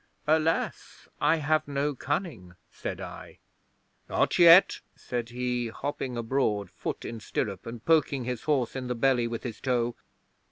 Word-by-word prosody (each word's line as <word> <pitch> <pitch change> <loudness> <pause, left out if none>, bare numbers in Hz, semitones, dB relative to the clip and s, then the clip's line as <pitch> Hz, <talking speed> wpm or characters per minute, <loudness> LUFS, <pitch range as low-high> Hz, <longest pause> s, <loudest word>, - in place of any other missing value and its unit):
'"Alas, 160 +1 0
I - - +4
have 155 -1 +1
no 145 +1 -1
cunning," 140 - -4 0.2
said - - -5
I. - - -9 0.7
'"Not - - +1
yet," 170 +2 +8 0.2
said 120 -1 -4
he, 125 0 -2
hopping 130 +1 -4
abroad, 115 -4 0
foot - - -5
in 115 - -5
stirrup, 100 -2 -3
and 115 -1 -8
poking 150 -5 +3
his 125 -1 -4
horse 135 -6 +1
in 130 -1 -4
the 125 - -2
belly 125 -1 +2
with 115 0 -5
his 120 -4 -6
toe. 120 -2 0
125 Hz, 150 wpm, -28 LUFS, 115-145 Hz, 0.7 s, yet